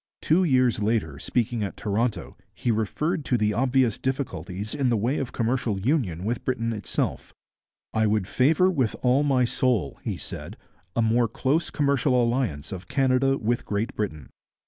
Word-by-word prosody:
Two 170 +4 +3
years 130 - +3
later, 105 -10 0
speaking 120 +4 -1
at 100 - -4
Toronto, 110 +3 -1 0.2
he 120 - 0
referred 130 - -1
to 125 - +2
the 105 -1 +1
obvious 125 -1 +2
difficulties 110 -7 -3
in 140 -4 +1
the 115 - +2
way 120 +8 0
of 135 - -3
commercial 115 -3 -1
union 100 - 0
with 115 +2 -2
Britain 115 -3 -1
itself. 105 -3 -3 0.6
'I 110 0 +2
would 105 -3 +1
favour 155 - +3
with 130 -10 0
all 130 +2 +4
my 135 -4 +3
soul,' 120 - 0
he - - -3
said, - - -6 0.4
'a 115 - +2
more 115 +1 +3
close 135 +8 0
commercial 140 -3 +2
alliance 115 - 0
of 90 -2 -7
Canada 135 0 +2
with 120 0 -1
Great 105 +5 -2
Britain. 80 -10 -4
120 Hz, 165 wpm, -25 LUFS, 105-130 Hz, 0.6 s, all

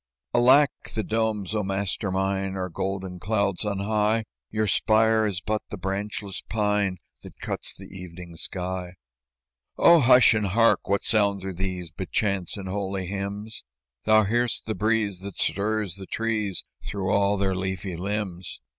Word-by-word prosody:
"Alack! 130 +4 +6 0.2
the 110 - 0
domes, 110 -3 -1
O 105 - +1
master 100 +1 -1
mine, 95 0 -1
Are 95 -1 -3
golden 95 +1 -4
clouds 100 0 0
on 105 -2 -1
high; 105 +2 +1 0.2
Yon 110 0 0
spire 110 +1 +3
is 95 -3 -2
but 110 +2 -1
the - - -5
branchless 100 +1 -3
pine 105 -3 +1 0.2
That - - -13
cuts - - -4
the - - -10
evening 90 -2 -9
sky." 90 +1 -4 0.8
"Oh, 170 0 +7
hush 125 -2 +7
and 105 -2 +1
hark! 115 +3 +3
What 100 0 +2
sounds 100 -3 +1
are 95 - -3
these 90 -2 -4
But 95 +4 -6
chants 100 -3 0
and 95 -1 -6
holy 95 -1 -2
hymns?" 100 +3 -5 0.4
"Thou 110 0 +6
hear'st 120 +3 0
the 110 - -1
breeze 110 -3 0
that 100 0 -8
stirs 100 +2 0
the 95 -1 -9
trees 110 -5 -1 0.2
Through 95 -1 -2
all 100 0 +3
their 95 -1 +1
leafy 95 -1 -3
limbs." 95 -1 -4
100 Hz, 155 wpm, -26 LUFS, 95-110 Hz, 0.8 s, Oh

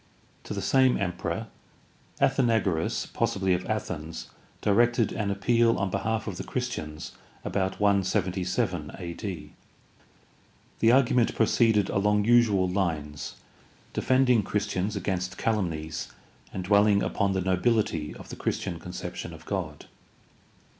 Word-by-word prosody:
To - - -5
the - - -3
same 130 -2 +4
emperor 90 +2 -2 0.7
Athenagoras, 115 -11 +1
possibly 95 -1 +1
of 90 +1 -2
Athens, 80 - -4 0.3
directed 120 +2 +3
an 105 -2 -2
appeal 115 +3 +2
on 95 0 -1
behalf 110 +2 -1
of - - -5
the - - -4
Christians 75 0 -4 0.3
about 95 -1 -1
177 95 -3 0
a.d. 90 0 -6 1.3
The 115 - +5
argument 125 -2 +3
proceeded 110 -2 +3
along 105 +1 +2
usual 110 -5 +4
lines, 80 -6 -2 0.6
defending 130 -3 +3
Christians 100 0 -2
against 95 0 -2
calumnies 80 -8 -2 0.4
and 95 - -4
dwelling 100 +1 +4
upon 100 -1 0
the 95 - 0
nobihty 95 -4 +1
of - - -12
the - - -6
Christian 85 - -3
con 90 +2 -9
ception 90 -2 -6
of 80 +1 -12
God. 85 -7 -4
100 Hz, 120 wpm, -27 LUFS, 90-110 Hz, 1.3 s, The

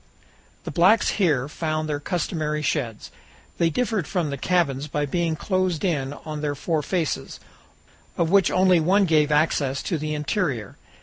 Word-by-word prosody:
The - - -5
blacks 190 +6 +4
here 150 -10 +1
found 155 0 -2
their 145 -1 -2
customary 155 -2 -2
sheds. 125 -7 -2 0.5
They 170 - +3
differed 210 -1 -1
from 170 -6 -1
the - - -2
cabins 145 -4 0
by 150 0 -1
being 165 +2 -1
closed 185 0 -1
in 145 -6 -1
on 155 -1 -5
their 145 -1 -1
four 155 +2 -1
faces, 165 0 -2 0.8
of 165 0 +1
which 195 -2 +5
only 185 -1 +4
one 190 +5 +3
gave 155 -3 +3
access 150 -3 +1
to 165 - -2
the 155 0 -3
interior. 150 - -2
155 Hz, 160 wpm, -24 LUFS, 145-180 Hz, 0.8 s, which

